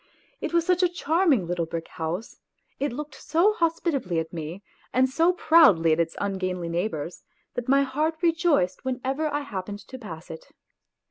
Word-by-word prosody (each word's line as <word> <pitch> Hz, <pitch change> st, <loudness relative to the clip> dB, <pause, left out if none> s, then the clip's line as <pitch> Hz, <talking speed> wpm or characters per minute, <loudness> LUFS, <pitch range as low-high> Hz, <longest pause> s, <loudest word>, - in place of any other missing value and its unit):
It -, -, -3 dB
was 340 Hz, -1 st, +2 dB
such 360 Hz, 0 st, +2 dB
a 360 Hz, -, +4 dB
charming 320 Hz, -, +2 dB
little 170 Hz, -1 st, -2 dB
brick 165 Hz, 0 st, -5 dB
house, 170 Hz, +6 st, -5 dB, 0.4 s
it 285 Hz, -1 st, 0 dB
looked 295 Hz, +3 st, -6 dB
so 345 Hz, +9 st, +2 dB
hospitably 330 Hz, -, 0 dB
at 160 Hz, +1 st, -2 dB
me, 165 Hz, +4 st, -6 dB, 0.3 s
and 255 Hz, +1 st, +3 dB
so 330 Hz, +7 st, +3 dB
proudly 260 Hz, -, +5 dB
at 155 Hz, -, 0 dB
its 165 Hz, -1 st, 0 dB
ungainly 185 Hz, -3 st, -2 dB
neighbours, 170 Hz, -2 st, -3 dB, 0.3 s
that 245 Hz, 0 st, -4 dB
my 275 Hz, +1 st, +5 dB
heart 300 Hz, +4 st, 0 dB
rejoiced 325 Hz, -, +2 dB
whenever 265 Hz, +4 st, -1 dB
I 290 Hz, +1 st, -1 dB
hap 195 Hz, -10 st, -5 dB
pened 205 Hz, 0 st, -7 dB
to 260 Hz, -, -9 dB
pass 170 Hz, -8 st, -9 dB
it. 160 Hz, -, -10 dB
255 Hz, 175 wpm, -26 LUFS, -, 0.4 s, proudly